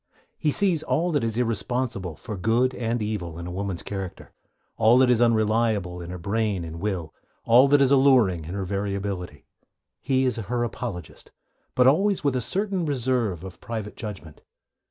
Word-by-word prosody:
He 150 Hz, -, +1 dB
sees 175 Hz, 0 st, +3 dB
all 170 Hz, +3 st, 0 dB
that 145 Hz, -6 st, +1 dB
is 115 Hz, -1 st, -2 dB
irresponsible 115 Hz, -6 st, -2 dB
for 105 Hz, -, -7 dB
good 115 Hz, +7 st, +1 dB
and 115 Hz, -2 st, -2 dB
evil 90 Hz, -6 st, -4 dB
in 85 Hz, -, -6 dB
a 90 Hz, -, -5 dB
woman's 95 Hz, -1 st, -4 dB
character, 95 Hz, -3 st, -6 dB, 0.4 s
all 115 Hz, +3 st, +5 dB
that 130 Hz, -1 st, +5 dB
is 120 Hz, -1 st, +3 dB
unreliable 110 Hz, -5 st, +1 dB
in 85 Hz, -, -8 dB
her 90 Hz, -, -5 dB
brain 100 Hz, +1 st, -1 dB
and 85 Hz, 0 st, -7 dB
will, 95 Hz, -6 st, -3 dB, 0.3 s
all 125 Hz, +4 st, +6 dB
that 145 Hz, 0 st, +4 dB
is 135 Hz, -1 st, +4 dB
alluring 125 Hz, -, +4 dB
in 85 Hz, +5 st, -6 dB
her 100 Hz, -1 st, -3 dB
variability. 100 Hz, -5 st, -4 dB, 0.6 s
He 130 Hz, 0 st, +1 dB
is 125 Hz, -3 st, 0 dB
her 120 Hz, +3 st, -2 dB
apologist, 115 Hz, -6 st, -6 dB, 0.4 s
but 125 Hz, -, +4 dB
always 190 Hz, +9 st, +3 dB
with 140 Hz, -3 st, +1 dB
a 125 Hz, -, 0 dB
certain 190 Hz, -, -1 dB
reserve 125 Hz, -, -1 dB
of 95 Hz, -3 st, -10 dB
private 110 Hz, -2 st, -5 dB
judgment. 100 Hz, -9 st, -8 dB
110 Hz, 175 wpm, -25 LUFS, 95-130 Hz, 0.6 s, all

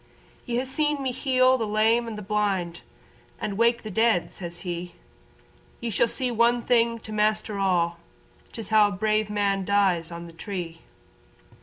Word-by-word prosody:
"Ye 240 Hz, 0 st, 0 dB
ha' 260 Hz, -, -2 dB
seen 295 Hz, +1 st, 0 dB
me 260 Hz, -, 0 dB
heal 255 Hz, 0 st, +3 dB
the 225 Hz, -, -1 dB
lame 220 Hz, +3 st, +2 dB
and 210 Hz, -3 st, -7 dB
blind, 195 Hz, -5 st, -1 dB, 0.6 s
And 210 Hz, -2 st, -3 dB
wake 235 Hz, +2 st, +2 dB
the 215 Hz, -, -6 dB
dead," 220 Hz, -3 st, +2 dB
says 175 Hz, -1 st, -7 dB
he, 175 Hz, 0 st, -5 dB, 0.8 s
"Ye 235 Hz, -, -3 dB
shall 220 Hz, -, +2 dB
see 250 Hz, +1 st, -1 dB
one 235 Hz, +1 st, +2 dB
thing 235 Hz, -1 st, +2 dB
to 220 Hz, -, -10 dB
master 215 Hz, -1 st, 0 dB
all: 170 Hz, -3 st, +1 dB, 0.5 s
'Tis 225 Hz, -4 st, -7 dB
how 215 Hz, -1 st, +6 dB
a -, -, -4 dB
brave 215 Hz, +2 st, 0 dB
man 200 Hz, -2 st, 0 dB
dies 185 Hz, -4 st, +2 dB
on 170 Hz, 0 st, -7 dB
the 170 Hz, -, -12 dB
tree." 170 Hz, -2 st, -6 dB
215 Hz, 165 wpm, -25 LUFS, 185-235 Hz, 0.8 s, how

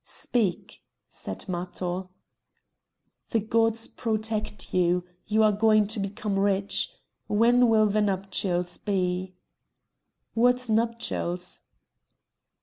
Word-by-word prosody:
"Speak!" 205 Hz, -3 st, -2 dB, 0.3 s
said -, -, -7 dB
Matho. 180 Hz, 0 st, -3 dB, 1.2 s
"The 225 Hz, -, +2 dB
gods 225 Hz, +1 st, +1 dB
protect 215 Hz, -2 st, -3 dB
you; 180 Hz, 0 st, +2 dB, 0.2 s
you 220 Hz, +1 st, +3 dB
are 215 Hz, -, +5 dB
going 215 Hz, 0 st, +4 dB
to 220 Hz, -, -2 dB
become 200 Hz, 0 st, -2 dB
rich. 195 Hz, 0 st, +1 dB, 0.4 s
When 240 Hz, +3 st, +4 dB
will 220 Hz, -1 st, +5 dB
the 210 Hz, +1 st, +2 dB
nuptials 190 Hz, -3 st, -1 dB
be?" 185 Hz, -2 st, -1 dB, 1.0 s
"What 245 Hz, +2 st, +3 dB
nuptials?" 220 Hz, -6 st, -1 dB
210 Hz, 95 wpm, -27 LUFS, 185-225 Hz, 1.2 s, are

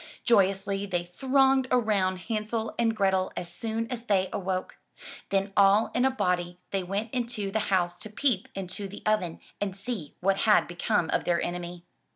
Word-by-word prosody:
Joyously 195 Hz, -2 st, +2 dB
they 175 Hz, -2 st, -1 dB
thronged 265 Hz, +8 st, +2 dB
around 200 Hz, -6 st, +1 dB
Hansel 220 Hz, +1 st, -2 dB
and 225 Hz, -1 st, +2 dB
Grethel 190 Hz, -2 st, +1 dB
as 175 Hz, -1 st, -3 dB
soon 225 Hz, +3 st, -2 dB
as 240 Hz, -1 st, -5 dB
they 190 Hz, -2 st, +2 dB
awoke. 190 Hz, -2 st, -3 dB, 0.5 s
Then 195 Hz, 0 st, 0 dB
all 200 Hz, +2 st, +5 dB
in 245 Hz, +2 st, +2 dB
a -, -, +5 dB
body 180 Hz, -8 st, -1 dB
they 195 Hz, -, 0 dB
went 200 Hz, +5 st, -3 dB
into 235 Hz, -5 st, -2 dB
the 220 Hz, -, +1 dB
house 175 Hz, -2 st, +1 dB
to 215 Hz, -, -7 dB
peep 215 Hz, -2 st, +1 dB
into 195 Hz, +1 st, -5 dB
the 200 Hz, +2 st, -10 dB
oven 210 Hz, -6 st, 0 dB, 0.2 s
and 195 Hz, -2 st, -2 dB
see 200 Hz, -, -5 dB
what 195 Hz, +1 st, +2 dB
had 210 Hz, +1 st, +4 dB
become 175 Hz, 0 st, 0 dB
of -, -, 0 dB
their 170 Hz, -1 st, +2 dB
enemy. 175 Hz, 0 st, -5 dB
195 Hz, 175 wpm, -28 LUFS, 185-220 Hz, 0.5 s, all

